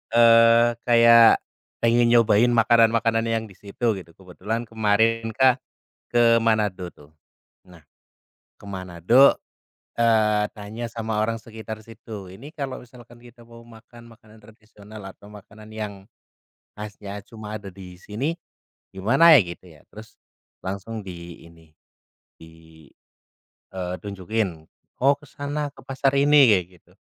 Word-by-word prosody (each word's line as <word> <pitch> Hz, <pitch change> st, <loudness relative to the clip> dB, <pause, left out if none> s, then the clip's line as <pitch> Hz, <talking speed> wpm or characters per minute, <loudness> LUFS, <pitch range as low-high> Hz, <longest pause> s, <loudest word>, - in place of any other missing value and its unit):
eee, 115 Hz, 0 st, +6 dB, 0.2 s
kayak 115 Hz, -1 st, +6 dB, 0.4 s
pengen 120 Hz, +1 st, +3 dB
nyobain 115 Hz, -1 st, +4 dB
makanan-makanan 115 Hz, 0 st, +2 dB
yang 115 Hz, -1 st, -1 dB
di -, -, -17 dB
situ, 110 Hz, +4 st, -3 dB
gitu. 85 Hz, -2 st, -16 dB
Kebetulan 105 Hz, +5 st, -6 dB
kemarin 115 Hz, +1 st, 0 dB
kan 130 Hz, 0 st, +3 dB, 0.5 s
ke 115 Hz, -1 st, +3 dB
Manado 105 Hz, -5 st, -1 dB
tuh. 75 Hz, -2 st, -20 dB, 0.5 s
Nah, 85 Hz, -5 st, -19 dB, 0.7 s
ke -, -, -19 dB
Manado, 95 Hz, -, +2 dB, 0.6 s
eee, 110 Hz, -2 st, +2 dB
tanya 110 Hz, +2 st, -8 dB
sama 115 Hz, -2 st, -5 dB
orang 115 Hz, 0 st, -4 dB
sekitar 110 Hz, -1 st, -9 dB
situ, 110 Hz, -3 st, -11 dB
"Ini 125 Hz, -, -12 dB
kalau 140 Hz, -4 st, -5 dB
misalkan 120 Hz, -1 st, -16 dB
kita 120 Hz, 0 st, -18 dB
mau 115 Hz, 0 st, -15 dB
makan 115 Hz, +1 st, -16 dB
makanan 110 Hz, -1 st, -20 dB
tradisional 110 Hz, -1 st, -15 dB
atau 100 Hz, -, -17 dB
makanan 105 Hz, +1 st, -14 dB
yang 105 Hz, -2 st, -5 dB, 0.8 s
khasnya 105 Hz, -1 st, -9 dB
cuma 110 Hz, -1 st, -9 dB
ada 100 Hz, -2 st, -9 dB
di 90 Hz, -1 st, -12 dB
sini 125 Hz, -, -4 dB, 0.6 s
gimana 135 Hz, -, +5 dB
ya?", -, -, +5 dB
gitu 85 Hz, +1 st, -10 dB
ya, -, -, -22 dB
terus 110 Hz, +1 st, -14 dB, 0.5 s
langsung 100 Hz, +3 st, -6 dB
di 85 Hz, -2 st, -10 dB
ini, 80 Hz, -1 st, -21 dB, 0.7 s
di, 80 Hz, -1 st, -18 dB, 0.9 s
eee, 90 Hz, -1 st, -4 dB
tunjukin, 100 Hz, -4 st, -4 dB, 0.4 s
"Oh, 140 Hz, +2 st, +5 dB
ke 145 Hz, -, -17 dB
sana, 145 Hz, +1 st, -4 dB
ke -, -, -16 dB
pasar 135 Hz, 0 st, 0 dB
ini", 145 Hz, -1 st, +5 dB
kayak 95 Hz, -4 st, +2 dB
gitu. -, -, -28 dB
110 Hz, 130 wpm, -23 LUFS, 100-115 Hz, 0.9 s, eee